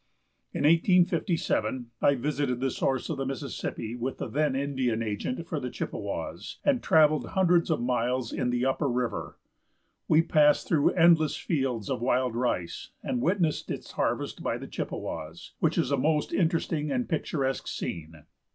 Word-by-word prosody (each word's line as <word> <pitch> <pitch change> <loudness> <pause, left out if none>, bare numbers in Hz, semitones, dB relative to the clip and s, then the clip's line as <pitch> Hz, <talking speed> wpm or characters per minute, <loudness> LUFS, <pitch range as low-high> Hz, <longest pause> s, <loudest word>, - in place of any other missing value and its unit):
In - - -3
1857 165 - +2
I 140 - +4
visited 135 -1 -1
the 135 0 0
source 130 +1 -1
of 155 - -3
the 135 - -2
Mississippi 120 -3 -4
with 125 +2 -3
the - - -4
then 150 -1 0
Indian 130 -5 0
agent 110 - -3
for - - -3
the - - -4
Chippewas, - - -5
and 275 -4 +3
traveled 155 -1 +4
hundreds 180 -3 +3
of 160 - +1
miles 125 0 0
in 125 - -1
the 125 +1 0
upper 135 +2 +1
river. 125 -1 -2 0.7
We 155 +1 +5
passed 150 -3 +4
through 150 -4 +3
endless 165 -3 +5
fields 130 - -1
of - - -2
wild 125 -1 +1
rice, 120 -8 -2
and 120 - -1
witnessed 170 -2 0
its - - -5
harvest - - -2
by - - -1
the - - -8
Chippewas, 80 +1 -6
which - - +1
is 125 - +1
a 140 - +2
most 150 +3 +1
interesting 165 -3 0
and 245 - -1
picturesque 140 -5 -1
scene. 80 -2 -5
135 Hz, 160 wpm, -28 LUFS, 125-160 Hz, 0.7 s, We